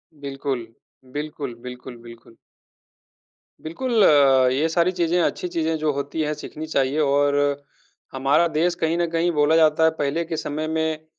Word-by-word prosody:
बिल्कुल। 135 Hz, -4 st, -5 dB, 0.5 s
बिल्कुल, 145 Hz, -4 st, -5 dB
बिल्कुल, 125 Hz, 0 st, -9 dB
बिल्कुल। 115 Hz, -1 st, -15 dB, 1.2 s
बिल्कुल, 220 Hz, +7 st, 0 dB, 0.5 s
ये 145 Hz, +5 st, +1 dB
सारी 170 Hz, +2 st, +2 dB
चीज़ें, 175 Hz, -1 st, 0 dB
अच्छी 180 Hz, -, -1 dB
चीज़ें 165 Hz, -2 st, -1 dB
जो 155 Hz, -1 st, 0 dB
होती 140 Hz, +3 st, -4 dB
हैं, 150 Hz, 0 st, -1 dB
सीखनी 150 Hz, +1 st, -8 dB
चाहिए 140 Hz, -1 st, 0 dB
और 145 Hz, -1 st, +2 dB, 0.8 s
हमारा 140 Hz, +5 st, +2 dB
देश 170 Hz, +2 st, 0 dB
कहीं 160 Hz, +1 st, +1 dB
न 175 Hz, -, +1 dB
कहीं 165 Hz, +1 st, 0 dB
बोला 150 Hz, 0 st, +2 dB
जाता 160 Hz, -1 st, +4 dB
है, 160 Hz, -, +6 dB
पहले 145 Hz, +4 st, 0 dB
के 165 Hz, -1 st, -4 dB
समय 155 Hz, +1 st, -4 dB
में 160 Hz, 0 st, -2 dB
155 Hz, 150 wpm, -22 LUFS, 140-165 Hz, 1.2 s, है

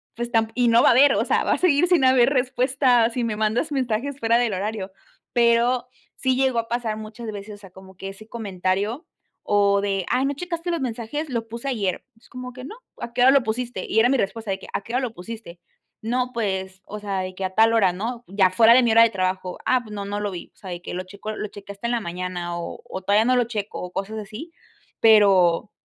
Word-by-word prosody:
"Pues, 240 Hz, +1 st, -4 dB
tam 225 Hz, -1 st, +2 dB
y 245 Hz, -1 st, +2 dB
no 230 Hz, +1 st, +5 dB
va -, -, +5 dB
a -, -, +7 dB
haber", 280 Hz, +3 st, +6 dB
o -, -, +1 dB
sea, -, -, +1 dB
va -, -, +2 dB
a -, -, 0 dB
seguir 350 Hz, -2 st, +4 dB
sin 350 Hz, -6 st, +3 dB
haber 260 Hz, -1 st, +5 dB
respuesta 255 Hz, -2 st, +2 dB
si 245 Hz, 0 st, -2 dB
me 220 Hz, -2 st, -1 dB
mandas 220 Hz, +8 st, 0 dB
mensajes 265 Hz, +1 st, -2 dB
fuera 230 Hz, -1 st, +3 dB
del 240 Hz, -4 st, 0 dB
horario, 200 Hz, 0 st, -4 dB, 0.4 s
pero 240 Hz, +1 st, +3 dB, 0.3 s
sí 260 Hz, -1 st, 0 dB
llegó 265 Hz, -2 st, +1 dB
a 230 Hz, -, -3 dB
pasar 235 Hz, -2 st, -2 dB
muchas 215 Hz, +1 st, -7 dB
veces. 205 Hz, +1 st, -8 dB
O -, -, -14 dB
sea, 200 Hz, -2 st, -14 dB
como 190 Hz, +1 st, -15 dB
que 195 Hz, -, -6 dB
ese 195 Hz, +3 st, -12 dB
comentario 205 Hz, -, -2 dB, 0.4 s
o 200 Hz, -1 st, +3 dB
de: 195 Hz, -2 st, -1 dB
"Ay, 255 Hz, +2 st, +2 dB
no 280 Hz, -, 0 dB
checaste 350 Hz, +1 st, -4 dB
los 335 Hz, -, -1 dB
mensajes, 255 Hz, +5 st, -4 dB
lo 230 Hz, -2 st, -3 dB
puse 235 Hz, +4 st, -6 dB
ayer". 205 Hz, -8 st, -2 dB
"Pues, 225 Hz, -, -25 dB
como 250 Hz, 0 st, -8 dB
que 255 Hz, 0 st, -10 dB
no, 300 Hz, +12 st, -8 dB, 0.3 s
¿a 235 Hz, -, -5 dB
qué 245 Hz, -, 0 dB
hora 265 Hz, -, +7 dB
lo 275 Hz, -3 st, +4 dB
pusiste?", 235 Hz, -3 st, -3 dB
y 220 Hz, -, +1 dB
era 235 Hz, -, +5 dB
mi 270 Hz, -, +2 dB
respuesta 220 Hz, +1 st, -3 dB
de 190 Hz, -, -2 dB
que, -, -, -12 dB
"¿A -, -, 0 dB
qué 230 Hz, +4 st, -9 dB
hora 255 Hz, -, +1 dB
lo 245 Hz, -4 st, -3 dB
pusiste?". 200 Hz, -3 st, -9 dB, 0.4 s
"No, 250 Hz, +3 st, -1 dB
pues, 190 Hz, -4 st, -3 dB
o 210 Hz, +1 st, -7 dB
sea, 200 Hz, -2 st, -3 dB
de 185 Hz, 0 st, -6 dB
que 190 Hz, -, -5 dB
a 185 Hz, -, 0 dB
tal 225 Hz, +1 st, +5 dB
hora", 200 Hz, -5 st, +4 dB
¿no?, 230 Hz, +6 st, -5 dB
ya 190 Hz, -1 st, +3 dB
fuera 225 Hz, +4 st, +6 dB
de 255 Hz, -, +6 dB
mi 235 Hz, -, +3 dB
hora 230 Hz, -, +8 dB
de 230 Hz, -, +4 dB
trabajo. 185 Hz, -2 st, -2 dB
"Ah, 255 Hz, -1 st, +3 dB
pues 215 Hz, -2 st, -11 dB
no, 200 Hz, -1 st, -5 dB
no 205 Hz, +1 st, -3 dB
lo 205 Hz, -1 st, -2 dB
vi". 175 Hz, -, -8 dB
O -, -, -34 dB
sea, 190 Hz, -, -10 dB
de 175 Hz, -1 st, -6 dB
que -, -, -7 dB
lo 185 Hz, -, -3 dB
checo 200 Hz, +3 st, -8 dB
lo 215 Hz, -, -4 dB
chequé 200 Hz, 0 st, -10 dB
hasta 200 Hz, +4 st, -5 dB
en -, -, -1 dB
la 240 Hz, -, +1 dB
mañana, 175 Hz, -1 st, -4 dB
o 170 Hz, -, -6 dB
o 190 Hz, -, -6 dB
todavía 205 Hz, +3 st, +3 dB
no 255 Hz, +1 st, +3 dB
lo 245 Hz, -, +3 dB
checo, 215 Hz, -3 st, -5 dB
o 180 Hz, 0 st, -6 dB
cosas 200 Hz, +4 st, -4 dB
así, 215 Hz, -, -9 dB, 0.5 s
pero 200 Hz, -3 st, +5 dB
225 Hz, 255 wpm, -23 LUFS, 195-245 Hz, 0.5 s, hora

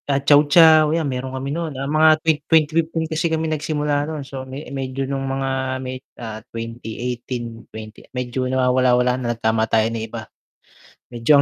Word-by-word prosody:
Ah, 140 Hz, -, +3 dB
Chow 145 Hz, +1 st, +5 dB
chow 155 Hz, -1 st, +7 dB
yan 165 Hz, -, -1 dB
meron 130 Hz, -1 st, -3 dB
kami 135 Hz, +2 st, -4 dB
nun, 160 Hz, -4 st, -4 dB
ah, 135 Hz, -, -3 dB
mga 155 Hz, +2 st, +5 dB
twen 160 Hz, -2 st, +3 dB
2015 160 Hz, +1 st, +2 dB
kasi 160 Hz, +1 st, -1 dB
kami 160 Hz, 0 st, -1 dB
nagsimula 150 Hz, -1 st, -1 dB
noon 150 Hz, -3 st, -5 dB
so 135 Hz, 0 st, -7 dB
me 135 Hz, +4 st, -7 dB
medyo 135 Hz, 0 st, -3 dB
nung 135 Hz, 0 st, -3 dB
mga 135 Hz, -1 st, -2 dB
may 130 Hz, 0 st, -6 dB, 0.2 s
ah, 110 Hz, -2 st, -7 dB
2018, 115 Hz, +1 st, -6 dB
twenty, 110 Hz, 0 st, -11 dB
medyo 125 Hz, 0 st, -3 dB
nawawala-wala 125 Hz, -1 st, +3 dB
na 120 Hz, -1 st, -2 dB
nagtama 110 Hz, 0 st, +1 dB
tayo 110 Hz, -1 st, +3 dB
ng 115 Hz, -, -3 dB
iba. 110 Hz, -1 st, -7 dB, 0.9 s
Medyo 120 Hz, +2 st, 0 dB
130 Hz, 170 wpm, -21 LUFS, 120-150 Hz, 0.9 s, chow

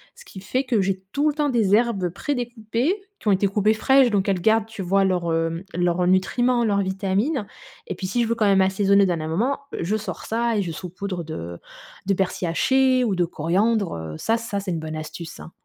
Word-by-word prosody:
Ce -, -, -15 dB
qui 190 Hz, -, -11 dB
fait 255 Hz, +7 st, -1 dB
que 235 Hz, -6 st, +1 dB
j'ai 190 Hz, 0 st, -1 dB
tout 290 Hz, +2 st, +2 dB
le 295 Hz, -, -3 dB
temps 300 Hz, -1 st, +1 dB
des 220 Hz, -6 st, +3 dB
herbes 215 Hz, -6 st, +1 dB
prédécoupées, 240 Hz, -, -2 dB, 0.3 s
qui -, -, -9 dB
ont -, -, +5 dB
été 195 Hz, +1 st, +3 dB
coupées 210 Hz, +2 st, +2 dB
fraîches 265 Hz, +3 st, +4 dB
donc 200 Hz, -1 st, +1 dB
elles 190 Hz, -3 st, 0 dB
gardent, 220 Hz, +2 st, +3 dB
tu 220 Hz, -3 st, -8 dB
vois 195 Hz, +2 st, +2 dB
leurs, 175 Hz, -3 st, 0 dB
hem, 165 Hz, +1 st, -1 dB
leurs 175 Hz, 0 st, +1 dB
nutriments, 240 Hz, +6 st, +2 dB
leurs 200 Hz, -2 st, +2 dB
vitamines 195 Hz, +6 st, -1 dB, 0.4 s
et -, -, -4 dB
puis, 190 Hz, -, -6 dB
si 240 Hz, +6 st, 0 dB
je -, -, -1 dB
veux 230 Hz, -, 0 dB
quand 220 Hz, -, +1 dB
même 195 Hz, -1 st, +4 dB
assaisonner 195 Hz, +1 st, +3 dB
au -, -, +4 dB
dernier 165 Hz, -3 st, -2 dB
moment, 230 Hz, -, 0 dB, 0.2 s
je 180 Hz, +6 st, 0 dB
sors 215 Hz, -, -6 dB
ça 230 Hz, 0 st, 0 dB
et -, -, +2 dB
je 170 Hz, -, -4 dB
saupoudre 185 Hz, +1 st, -5 dB
de 85 Hz, -, -6 dB, 0.5 s
de 200 Hz, -, +3 dB
persil 185 Hz, -1 st, -1 dB
haché 260 Hz, +8 st, +3 dB
ou 205 Hz, -5 st, 0 dB
de 180 Hz, -, +2 dB
coriandre. 190 Hz, +6 st, 0 dB
Heu, 80 Hz, -1 st, -6 dB
ça, 225 Hz, -, +1 dB
ça, 230 Hz, -3 st, -4 dB
c'est 195 Hz, -2 st, -4 dB
une 165 Hz, -, -2 dB
bonne 155 Hz, 0 st, -5 dB
astuce, 165 Hz, +1 st, -8 dB
hein! -, -, -11 dB
200 Hz, 225 wpm, -23 LUFS, 180-230 Hz, 0.5 s, ont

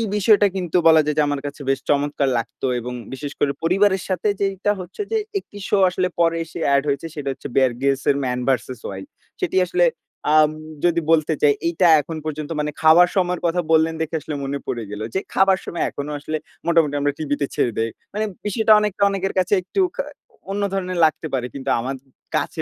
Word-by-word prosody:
বিষয়টা 210 Hz, 0 st, +5 dB
কিন্তু 180 Hz, -2 st, 0 dB
বলা 160 Hz, -1 st, +7 dB
যায় 150 Hz, -, -1 dB
যে, -, -, +5 dB
আমার 145 Hz, -1 st, -2 dB
কাছে 145 Hz, 0 st, -8 dB
বেশ 135 Hz, -, +2 dB
চমৎকার 145 Hz, -1 st, +1 dB
লাগত 115 Hz, -, -5 dB, 0.2 s
এবং 125 Hz, +1 st, -6 dB, 0.2 s
বিশেষ 145 Hz, +2 st, -5 dB
করে 145 Hz, -, +2 dB
পরিবারের 190 Hz, +2 st, +3 dB
সাথে 185 Hz, +3 st, 0 dB
যেইটা 195 Hz, +1 st, 0 dB
হচ্ছে 185 Hz, -, -7 dB
যে 445 Hz, -, +2 dB, 0.2 s
একটি 205 Hz, -, -14 dB
শো 205 Hz, -, +3 dB
আসলে 180 Hz, 0 st, 0 dB
পরে 165 Hz, 0 st, +3 dB
এসে 165 Hz, -, -9 dB, 0.2 s
এড 140 Hz, -, +2 dB
হয়েছে, 140 Hz, +4 st, -1 dB
সেটা 140 Hz, -2 st, -3 dB
হচ্ছে -, -, -8 dB
'Bear 130 Hz, -2 st, +4 dB
Grylls' 135 Hz, 0 st, 0 dB
এর 140 Hz, -, +4 dB
'Man 125 Hz, -1 st, -1 dB
vs. 125 Hz, -1 st, -1 dB
Wild'। 95 Hz, 0 st, -8 dB, 0.3 s
সেটি -, -, -1 dB
আসলে 340 Hz, -, +2 dB, 0.5 s
আম 155 Hz, -1 st, +5 dB, 0.3 s
যদি 170 Hz, -1 st, +2 dB
বলতে 160 Hz, -1 st, +3 dB
চাই, 145 Hz, -1 st, +5 dB
এইটা 170 Hz, +1 st, +3 dB
এখন 160 Hz, +2 st, -7 dB
পর্যন্ত 155 Hz, -1 st, -4 dB
মানে 150 Hz, 0 st, -1 dB
খাওয়ার 170 Hz, +3 st, +7 dB
সময়ের 180 Hz, -2 st, +1 dB
কথা 175 Hz, +1 st, +1 dB
বললেন 160 Hz, 0 st, +4 dB
দেখে 160 Hz, +1 st, -2 dB
আসলে 150 Hz, -, -5 dB
মনে 140 Hz, +1 st, -3 dB
পড়ে 120 Hz, -2 st, -3 dB
গেল 105 Hz, -, -6 dB
যে, -, -, +3 dB
খাবার 190 Hz, 0 st, +4 dB
সময় 170 Hz, -, -3 dB
এখনো 145 Hz, +1 st, -6 dB
আসলে 155 Hz, +2 st, -3 dB, 0.3 s
মোটামুটি 160 Hz, -4 st, +3 dB
আমরা 145 Hz, 0 st, +2 dB
টিভিতে 145 Hz, -2 st, -1 dB
ছেড়ে 120 Hz, -, +1 dB
দেই। 115 Hz, -, 0 dB, 0.2 s
মানে, 215 Hz, +1 st, -1 dB, 0.2 s
বিষয়টা 220 Hz, +1 st, +4 dB
অনেকটা 205 Hz, -1 st, -1 dB
অনেকের 195 Hz, -1 st, -2 dB
কাছে 185 Hz, +2 st, +1 dB
একটু 385 Hz, -, -1 dB
খা -, -, -1 dB, 0.5 s
অন্য 205 Hz, +1 st, -2 dB
ধরনের 185 Hz, -2 st, -2 dB
লাগতে 155 Hz, +1 st, -1 dB
পারে 125 Hz, -2 st, -1 dB
কিন্তু 135 Hz, 0 st, -4 dB
আমার 130 Hz, +3 st, -3 dB, 0.4 s
কাছে -, -, -3 dB
160 Hz, 200 wpm, -21 LUFS, 140-185 Hz, 0.5 s, বলা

